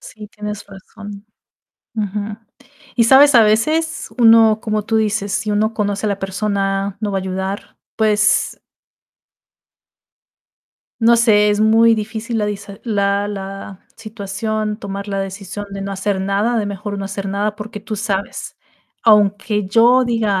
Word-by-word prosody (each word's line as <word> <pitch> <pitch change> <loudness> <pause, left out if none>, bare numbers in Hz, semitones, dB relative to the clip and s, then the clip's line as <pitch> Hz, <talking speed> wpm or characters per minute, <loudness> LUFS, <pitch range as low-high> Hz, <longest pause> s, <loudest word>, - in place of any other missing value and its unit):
Sí, 210 -1 -11
tienes 210 0 -7
razón. 205 +1 -11 0.7
Ujú. 210 0 -3 0.6
Y, 235 - +4
sabes, 270 +4 +6
a 230 - +8
veces 310 +10 +1
uno, 225 -2 +6
como 215 -2 -2
tú 225 +1 0
dices, 210 -2 0
si 210 0 -1
uno 215 +2 0
conoce 205 0 -1
a - - +1
la 200 - -2
persona, 195 0 -2
no 210 -2 -2
va 195 - 0
a - - -3
ayudar, 190 +1 -5 0.2
pues 215 -1 +2 2.4
no 235 +1 +5
sé, 210 -3 +4
es 205 0 0
muy 225 +1 +5
difícil 220 +2 -4
la 210 - 0
disa 200 -1 -6
la 200 -2 0
la 195 -1 -7 0.2
situación, 215 0 -4
tomar 200 -1 -6
la 195 - -2
decisión 195 +1 -6
de 195 - -5
no 195 0 -4
hacer 195 0 -2
nada, 200 +5 0
de 210 - -1
mejor 200 0 -5
no 195 - -4
hacer 195 0 -5
nada, 205 +2 -2
porque 210 0 -8
tú 215 - -5
sabes, 200 -2 -4 0.5
aunque 210 -1 +3
yo 235 +5 +4
diga 220 -5 0
210 Hz, 150 wpm, -18 LUFS, 200-220 Hz, 2.4 s, a